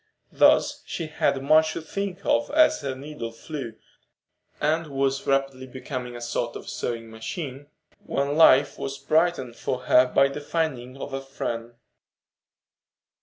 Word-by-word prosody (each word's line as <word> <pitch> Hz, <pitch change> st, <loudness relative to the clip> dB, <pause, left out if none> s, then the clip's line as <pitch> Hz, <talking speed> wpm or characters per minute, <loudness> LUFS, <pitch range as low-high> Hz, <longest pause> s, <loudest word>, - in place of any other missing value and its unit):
Thus -, -, +4 dB
she 165 Hz, -, -4 dB
had 140 Hz, -3 st, 0 dB
much 155 Hz, +2 st, +4 dB
to 165 Hz, -, -4 dB
think 200 Hz, +2 st, -5 dB
of 290 Hz, 0 st, +2 dB
as 310 Hz, +1 st, +4 dB
her 135 Hz, -2 st, -3 dB
needle 135 Hz, -4 st, -7 dB
flew, 120 Hz, -1 st, -7 dB, 0.8 s
and 160 Hz, +2 st, +1 dB
was 135 Hz, -1 st, -1 dB
rapidly 135 Hz, -1 st, 0 dB
becoming 125 Hz, -1 st, -6 dB
a 120 Hz, -, -8 dB
sort 120 Hz, 0 st, -2 dB
of -, -, -8 dB
sewing 115 Hz, -1 st, -4 dB
machine 135 Hz, +4 st, -6 dB, 0.4 s
when 140 Hz, +1 st, 0 dB
life 145 Hz, -3 st, +6 dB
was 135 Hz, 0 st, -4 dB
brightened 155 Hz, -8 st, +1 dB
for 125 Hz, +1 st, -3 dB
her 125 Hz, 0 st, +5 dB
by 140 Hz, +2 st, +4 dB
the 140 Hz, +2 st, -6 dB
finding 135 Hz, -5 st, -2 dB
of 135 Hz, -, -7 dB
a 135 Hz, -, -2 dB
friend. 120 Hz, -3 st, -5 dB
135 Hz, 145 wpm, -25 LUFS, 125-155 Hz, 0.8 s, life